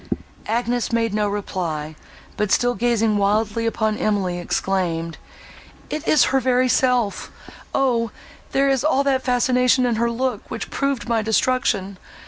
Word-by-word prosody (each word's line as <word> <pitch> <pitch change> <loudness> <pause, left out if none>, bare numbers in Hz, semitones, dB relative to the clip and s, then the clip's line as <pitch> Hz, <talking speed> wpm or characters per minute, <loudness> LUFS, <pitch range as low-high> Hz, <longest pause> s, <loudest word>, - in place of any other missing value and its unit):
Agnes 240 +1 -1
made 230 -2 0
no 210 -1 +1
reply; 170 -7 -4 0.4
but, 210 -1 -1
still 245 0 +3
gazing 225 -1 +1
wildly 215 +3 +1
upon 220 -1 -1
Emily, 190 -4 0
exclaimed, 175 -3 -2 0.7
"It 310 +2 -4
is 305 - +5
her 270 - +4
very 255 0 +2
self! 250 -4 +1 0.4
Oh! 240 -4 +1 0.4
there 275 +1 +2
is 270 -1 +1
all 280 -2 +2
that 270 -2 +1
fascination 250 0 +2
in 235 -2 0
her 235 +1 +1
look, 240 -2 -3
which - - -6
proved 275 -3 -1
my 230 -2 +1
destruction! 215 -4 0
230 Hz, 140 wpm, -21 LUFS, 205-255 Hz, 0.7 s, is